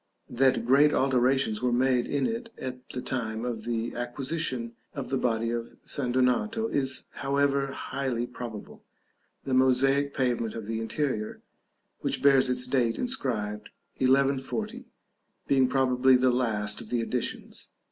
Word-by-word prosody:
That 130 0 +2
great 140 +4 +5
alterations 130 -3 +2
were 125 -1 +1
made 125 0 +2
in 140 -2 0
it 230 0 -3
at 130 0 -7
the 125 - -5
time 115 -3 -3
of 115 -3 -4
the 115 0 -2
acquisition 125 -1 -3 0.2
of 140 -3 -5
the 135 - 0
body 115 -1 0
of 120 0 -5
St. 125 -4 -2
Donato 130 - +1
is 135 -2 -1 0.2
however 140 0 +1
highly 130 -3 -3
probable, 120 -3 -8 0.6
the 135 - -2
mosaic 135 +2 +4
pavement 120 -4 0
of 115 -2 -5
the 110 +1 -3
interior, 115 -2 -2 0.6
which - - -2
bears 135 -2 +5
its 125 0 +1
date 125 -3 +1
inscribed, 110 - -2 0.3
1140, 140 - +1 0.6
being 135 -2 +4
probably 130 0 +3
the 125 0 +4
last 110 -4 -1
of - - -11
the 120 - 0
additions. 120 +1 -3
130 Hz, 140 wpm, -28 LUFS, 120-135 Hz, 0.6 s, great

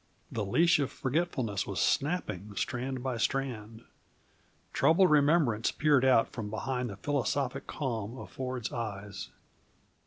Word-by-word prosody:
The 110 - -2
leash 160 - +4
of 140 -1 0
forgetfulness 130 - -1
was 100 - -3
snapping, 105 - 0
strand 130 +2 -2
by 130 -3 -2
strand. 115 -3 -2 0.9
Troubled 170 +2 +4
remembrance 145 -7 +4
peered 145 -4 +3
out 130 -3 +5
from 110 -3 -4
behind 125 +3 -2
the 100 - -7
philosophic 135 +1 -1
calm 115 -4 -3
in - - -7
Ford's 130 -3 -4
eyes. 105 -3 -5
130 Hz, 125 wpm, -30 LUFS, 110-140 Hz, 0.9 s, out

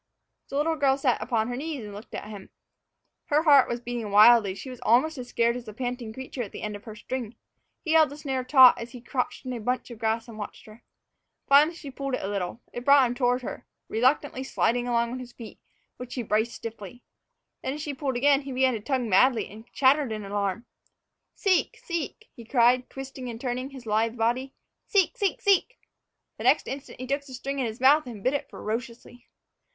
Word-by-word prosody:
The - - -6
little 320 +2 +1
girl 275 -2 +3
sat 260 -5 +1
upon 220 -1 0
her 245 - -3
knees 290 -1 -4
and 205 - -9
looked 205 +2 -10
at - - -6
him. 205 -3 -10 0.8
Her 300 +2 +2
heart 285 -4 +6
was 240 - -2
beating 240 -3 -4
wildly, 215 +1 +7
and 190 - -5
she 260 - -8
was 250 - -11
almost 260 +8 +3
as 245 - -6
scared 235 0 +1
as 245 -1 -7
the 215 -2 -10
panting 245 -2 -4
creature 260 +2 -6
at 210 - -5
the - - -8
end 210 -1 -3
of 205 - -11
her 220 -2 -8
string. 235 0 -5 0.5
He 315 - -1
held 320 -1 +5
the 285 - -9
snare 270 -4 -3
taut 255 -1 +7
as 235 +1 -8
he 250 - -8
crouched 250 +2 -3
in 255 - -3
a 240 - -4
bunch 250 +3 -2
of 230 - -10
grass 225 +1 -1
and 220 -2 -10
watched 205 - -8
her. 215 +1 -15 0.6
Finally, 295 +4 +5
she 285 -4 -9
pulled 275 0 -3
at - - -5
it - - -4
a - - -3
little. 200 +3 -3
It 240 - -5
brought 280 0 +6
him 240 - -1
toward 245 0 +1
her, - - -7 0.2
reluctantly 260 +3 +1
sliding 245 -2 0
along 235 -1 +1
on 255 - -5
his 250 -1 -10
feet, 230 -3 -11 0.4
which 250 -1 -8
he 250 - -2
braced 220 +2 0
stiffly. 225 +1 -9 0.6
Then, 265 - -3
as 300 - -6
she 295 - -4
pulled 265 -2 -2
again, 280 +2 +4
he 275 -1 -7
began 260 0 +2
to 225 - -3
tug 260 +4 -1
madly, 230 +3 +3
and 220 +3 -13
clattered 275 -1 +3
in 215 -2 -4
alarm. 200 +2 -2 0.7
"Seek 385 -3 +1
seek!" 340 +6 -5
he 235 - -11
cried, 245 +1 +3
twisting 270 -1 -7
and 230 -1 -7
turning 255 +1 -3
his 265 -3 -11
lithe 225 +2 0
body; 245 +4 -1 0.3
"seek 400 +1 +2
seek 405 -6 -1
seek!" 405 +5 +2 0.6
The - - -5
next 260 +5 +3
instant 270 -1 -7
he 255 - -5
took 280 +2 -1
the 265 -2 -10
string 275 +2 -4
into 245 -3 0
his 220 - -9
mouth 280 +3 +5
and 215 -5 -9
bit 255 - +2
it 285 - -3
ferociously. 235 +2 -6
250 Hz, 225 wpm, -26 LUFS, 230-275 Hz, 0.8 s, wildly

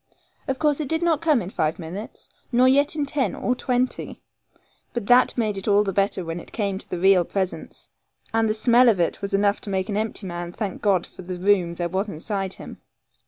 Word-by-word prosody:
Of 265 -1 -1
course 300 0 +1
it 300 - -2
did 320 +4 -1
not 330 -3 +2
come 305 -8 +2
in 180 - -7
five 155 -4 -1
minutes, 180 +6 -8 0.2
nor 250 +1 +4
yet 285 +3 +3
in 295 -2 0
ten 275 -1 -1
or 250 - 0
twenty; 250 0 -2 0.7
but 235 -4 -3
that 245 +4 +4
made 215 -4 0
it 195 - -6
all 205 0 +4
the 195 -2 -2
better 195 -2 0
when 165 +1 -4
it - - -13
came 200 -3 -2
to - - -12
the 180 - -3
real 190 0 +5
presence; 190 0 -4 0.5
and 225 -1 +2
the 215 - +1
smell 240 +2 +5
of 205 -5 +2
it 170 - 0
was 200 0 -1
enough 200 +1 +2
to - - -7
make 190 0 -1
an 205 - -1
empty 215 -1 -3
man 175 -1 -5
thank 200 -3 -4
God 190 -4 +2
for - - -12
the 180 0 -6
room 180 -2 +2
there 175 0 -2
was 190 +4 -2
inside 195 +3 -3
him. - - -11
205 Hz, 225 wpm, -23 LUFS, 185-245 Hz, 0.7 s, real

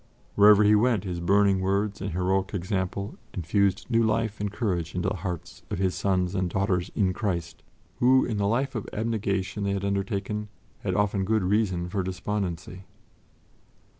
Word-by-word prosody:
Wherever 105 0 +7
he 105 +1 +5
went, 110 -1 +3
his 90 -3 -4
burning 100 +2 +3
words 100 +1 0
and 95 - -2
heroic 95 +3 0
example 95 +1 -3 0.2
infused 100 +3 +1
new 115 -2 +2
life 110 -1 0
and 100 -1 -2
courage 90 -7 -2
into 90 - 0
the 105 - -3
hearts 90 -2 -6
of - - -2
his 95 0 +1
sons 90 -2 0
and 95 -2 0
daughters 95 -1 0
in 95 -3 +2
Christ, 85 -5 -3 0.4
who, 130 +2 +5
in 110 -4 -2
the 100 0 +1
life 130 +5 0
of 110 -5 -4
abnegation 100 -2 -1
they 100 0 0
had 100 0 -2
undertaken, 100 +1 -2 0.3
had - - -2
often 100 -1 +1
good 110 +1 +1
reason 95 -3 +1
for 95 +2 -1
despondency. 95 -1 -4
100 Hz, 165 wpm, -26 LUFS, 95-105 Hz, 0.4 s, Wherever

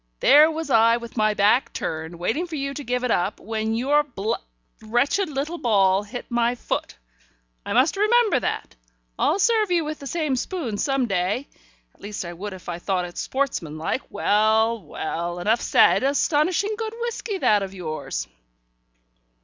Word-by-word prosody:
"There 300 +2 +7
was 320 -2 -4
I 230 0 +5
with 235 -1 -10
my 215 -2 +2
back 210 +6 +3
turned, 160 +2 -4
waiting 230 - -1
for 330 - -6
you 275 -1 -3
to 290 - -6
give 250 0 -2
it 250 - 0
up, 180 +4 0
when 220 +1 -2
your 280 +5 +3
bl 230 -7 -3 0.5
wretched 245 - +1
little 300 +4 -3
ball 195 -6 +3
hit 225 +4 -7
my 240 0 +1
foot. - - -4 0.7
I - - -4
must 265 +9 +3
remember 430 - +3
that. - - -4 0.4
I'll 355 - +2
serve 435 0 +2
you 340 -3 +1
with 305 0 -5
the 280 - -7
same 305 -3 -1
spoon 250 - -3
some 270 +1 +1
day, 195 +5 -1 0.5
at - - -28
least 205 -2 -5
I 170 - -6
would 200 +4 -6
if 185 - -12
I 175 -1 -4
thought 180 -1 -1
it 175 - -10
sportsmanlike. 170 - -2
Well, 220 +2 +2
well, 170 +2 -4
enough 215 +6 +1
said. - - +4
Astonishing 305 +8 +1
good 445 0 -4
whisky, 470 -3 -3
that 210 - +3
of 195 0 -5
yours." 155 -4 -4
240 Hz, 170 wpm, -23 LUFS, 200-300 Hz, 0.7 s, There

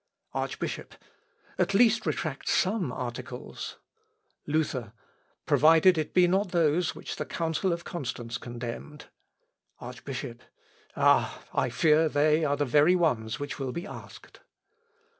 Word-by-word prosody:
Archbishop. - - -4 0.6
"At 185 +2 +1
least 230 +1 +4
retract 150 -4 -2
some 190 - +1
articles." 125 0 -6 0.7
Luther. 140 -7 -1 0.5
"Provided 165 +4 +6
it 155 -2 -2
be 180 -1 +6
not 190 +2 +1
those 170 0 +1
which - - -7
the - - -3
Council 165 +3 -1
of 170 0 -3
Constance 120 -6 -5
condemned." 120 +5 -7 0.7
Archbishop. 125 0 -7 0.5
"Ah, - - +3
I - - +1
fear 160 0 +3
they 150 +2 +3
are 145 -1 +1
the 145 - +1
very 150 +7 +4
ones 120 -10 0
which 145 0 -5
will 135 -2 -2
be 170 +6 -5
asked." - - -11
150 Hz, 120 wpm, -28 LUFS, 125-175 Hz, 0.7 s, Provided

